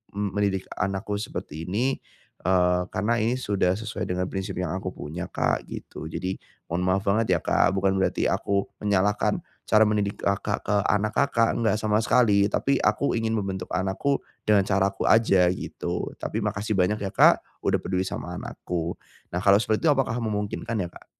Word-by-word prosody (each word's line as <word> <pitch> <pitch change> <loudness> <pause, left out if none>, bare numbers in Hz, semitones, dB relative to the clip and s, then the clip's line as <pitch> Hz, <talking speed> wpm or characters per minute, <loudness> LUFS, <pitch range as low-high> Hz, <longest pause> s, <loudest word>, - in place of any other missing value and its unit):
m 105 0 -1
"mendidik 100 -1 0 0.2
anakku 100 +2 -1
seperti 80 -6 -6
ini," 125 +8 0 0.4
eee, 90 0 +3
"karena 115 +5 0
ini 115 +3 +1
sudah 100 -6 +1
sesuai 110 +2 -4
dengan 90 0 -1
prinsip 95 -1 -4
yang 90 0 -2
aku 95 0 -3
punya 85 +4 -6
Kak" - - -1
gitu 80 - -8
jadi, 95 +4 -4 0.3
"mohon 85 +2 0
maaf 95 +1 +2
banget 100 -1 +2
ya - - 0
Kak 95 - +3
bukan 95 0 +2
berarti 95 - +1
aku 100 -1 0 0.2
menyalahkan 100 0 +1 0.2
cara 110 - +5
mendidik 105 -1 0
Kakak 100 +1 0
ke 105 - +1
anak 105 +1 +1
Kakak, 115 -5 +3
enggak 110 -2 +2
sama 105 -1 +2
sekali 110 -3 +4
tapi 140 +5 +1
aku 140 - +1
ingin 115 0 0
membentuk 95 -3 -3
anakku, 95 +10 0 0.3
dengan 105 -2 +5
caraku 95 0 0
aja 95 -5 +5
gitu 90 - -4
tapi - - -3
makasih 105 +1 -1
banyak 100 +3 +1
ya 95 - -1
Kak - - +5 0.2
udah - - +2
peduli 95 0 -1
sama - - -5
anakku," 85 -1 -4 0.4
nah 90 - -1
kalau 100 0 +6
seperti 110 +5 0
itu - - +7
apakah 135 -5 0
memungkinkan 110 +1 -2
ya - - -7
Kak? - - -15
100 Hz, 175 wpm, -25 LUFS, 95-110 Hz, 0.4 s, itu